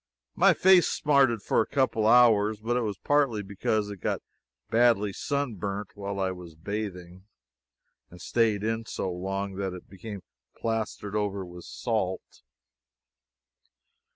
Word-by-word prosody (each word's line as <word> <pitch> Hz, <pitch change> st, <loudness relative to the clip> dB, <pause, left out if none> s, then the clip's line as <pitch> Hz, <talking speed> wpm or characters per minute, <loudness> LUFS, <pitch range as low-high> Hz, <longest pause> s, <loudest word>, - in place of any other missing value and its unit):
My -, -, +5 dB
face 185 Hz, -1 st, +6 dB
smarted 135 Hz, -8 st, +2 dB
for -, -, +2 dB
a -, -, -2 dB
couple 120 Hz, -5 st, +1 dB
of -, -, +6 dB
hours, 110 Hz, -3 st, +5 dB
but 115 Hz, +3 st, -1 dB
it 125 Hz, -, +1 dB
was 105 Hz, -4 st, -3 dB
partly 140 Hz, -7 st, +1 dB
because 105 Hz, +1 st, -1 dB
I -, -, -4 dB
got 95 Hz, -, -2 dB
it -, -, -13 dB, 0.5 s
badly 115 Hz, -4 st, +3 dB
sun 140 Hz, -4 st, -2 dB
burned 100 Hz, +1 st, -4 dB
while 100 Hz, -1 st, -5 dB
I 95 Hz, -1 st, 0 dB
was 90 Hz, -3 st, -10 dB
bathing, 95 Hz, 0 st, -6 dB, 0.8 s
and 90 Hz, -, -14 dB
staid 110 Hz, -2 st, +1 dB
in 115 Hz, +1 st, -2 dB
so 95 Hz, -, -3 dB
long 95 Hz, +2 st, -4 dB
that 95 Hz, -2 st, -2 dB
it 90 Hz, -, -10 dB
became 100 Hz, 0 st, -8 dB, 0.3 s
plastered 110 Hz, -2 st, -3 dB
over 100 Hz, -2 st, -1 dB
with 90 Hz, 0 st, -11 dB
salt. 105 Hz, -6 st, -3 dB
105 Hz, 150 wpm, -27 LUFS, 95-115 Hz, 0.8 s, face